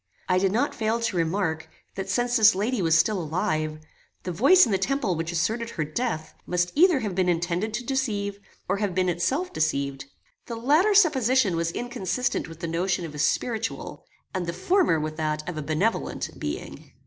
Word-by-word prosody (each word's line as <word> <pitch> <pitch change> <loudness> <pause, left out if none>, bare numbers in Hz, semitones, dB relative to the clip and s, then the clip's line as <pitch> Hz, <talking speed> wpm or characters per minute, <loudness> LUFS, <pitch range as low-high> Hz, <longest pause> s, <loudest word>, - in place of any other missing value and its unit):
I 180 - +3
did 190 0 +2
not 245 +8 +1
fail 220 +1 0
to 230 -4 -2
remark, 165 -1 -1 0.2
that 195 0 -5
since 245 +5 +1
this 220 -2 +6
lady 215 +3 0
was 165 -2 +4
still 190 +3 +2
alive, 155 -2 -1 0.5
the 180 - -3
voice 275 - +6
in 230 - -3
the 190 - +2
temple 260 -1 0
which 165 +1 -3
asserted 220 +8 -1
her 160 - -3
death, 160 +1 -3
must 180 0 0
either 330 -3 +4
have 210 -4 -3
been 180 0 +1
intended 175 +5 0
to 240 - -3
deceive, 215 -6 -2 0.3
or - - 0
have 200 -3 -2
been 185 -1 +2
itself 265 - -1
deceived. 140 -3 -1 0.4
The 235 - -4
latter 305 - +3
supposition 260 - +4
was 165 0 0
inconsistent 245 +2 -2
with 165 0 -12
the 170 - -2
notion 175 +2 -1
of 155 - -8
a 150 - -7
spiritual, 225 +8 -2 0.3
and 185 -3 -2
the 170 - -2
former 340 - +2
with 155 0 -4
that 155 0 -2
of 180 - -4
a 155 - -3
benevolent 155 +9 -1
being. - - -6
190 Hz, 190 wpm, -25 LUFS, 165-235 Hz, 0.5 s, this